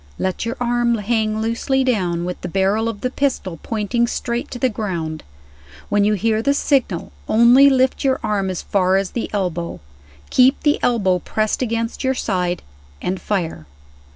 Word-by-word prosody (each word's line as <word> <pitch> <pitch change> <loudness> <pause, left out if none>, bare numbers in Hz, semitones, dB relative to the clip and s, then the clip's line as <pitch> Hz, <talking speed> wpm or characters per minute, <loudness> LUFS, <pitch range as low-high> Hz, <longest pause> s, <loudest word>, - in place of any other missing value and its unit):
"Let 190 +4 -2
your 235 - -3
arm 240 -1 +1
hang 220 0 0
loosely 265 +4 0
down, 180 -9 0
with 180 0 -5
the - - -4
barrel 195 +5 +1
of 205 -3 -6
the 255 - -1
pistol 230 - -2
pointing 230 +2 0
straight 235 0 -3
to - - -6
the 260 - +2
ground. 175 -9 -3 0.7
When 205 0 +3
you 210 +1 +3
hear 220 +2 +1
the 280 +4 +2
signal, 260 - 0 0.2
only 245 +5 +7
lift 260 -1 +2
your 265 -1 +2
arm 205 -3 0
as 185 - -4
far 190 -1 +2
as 195 -1 -1
the 235 - -3
elbow; 175 -4 -2 0.5
keep 260 +2 +4
the 295 -1 +3
elbow 195 -7 +2
pressed 215 +6 -1
against 230 0 -2
your 265 0 +1
side 180 -6 -1 0.4
and 185 +1 -3
fire." 165 - -3
220 Hz, 170 wpm, -20 LUFS, 190-245 Hz, 0.7 s, only